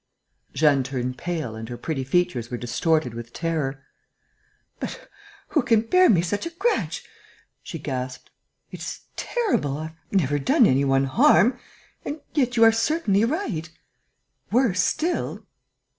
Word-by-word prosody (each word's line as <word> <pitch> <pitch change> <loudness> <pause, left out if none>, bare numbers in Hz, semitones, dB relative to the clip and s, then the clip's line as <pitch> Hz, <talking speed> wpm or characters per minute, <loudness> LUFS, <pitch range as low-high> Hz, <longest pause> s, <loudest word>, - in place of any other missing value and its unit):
Jeanne 145 -3 +4
turned 125 -1 -3
pale 160 -10 -3
and 110 +1 -7
her 120 - -6
pretty 135 +2 -3
features 135 -5 0
were 125 - -3
distorted 125 +2 0
with 120 0 -8
terror: 145 -5 -2 0.9
"But - - -6 0.4
who 300 - +2
can 230 -3 +3
bear 365 +11 +4
me 175 -5 +4
such 205 - -2
a - - -4
grudge?" 390 +8 -1 0.6
she 165 - -7
gasped. 130 -4 -5 0.4
"It - - -8
is - - -6
terrible.... 380 - -1
I - - -5
have 160 - -20 0.2
never 145 -7 +1
done 135 - +4
any 135 +2 +3
one 135 0 +3
harm.... 245 - +4 0.4
And 295 - -5
yet 250 -5 +1
you 230 - +6
are 225 - +8
certainly 225 - +2
right.... 230 - -2 0.8
Worse 225 -6 +3
still...." 340 +2 -1
165 Hz, 145 wpm, -24 LUFS, -, 0.9 s, are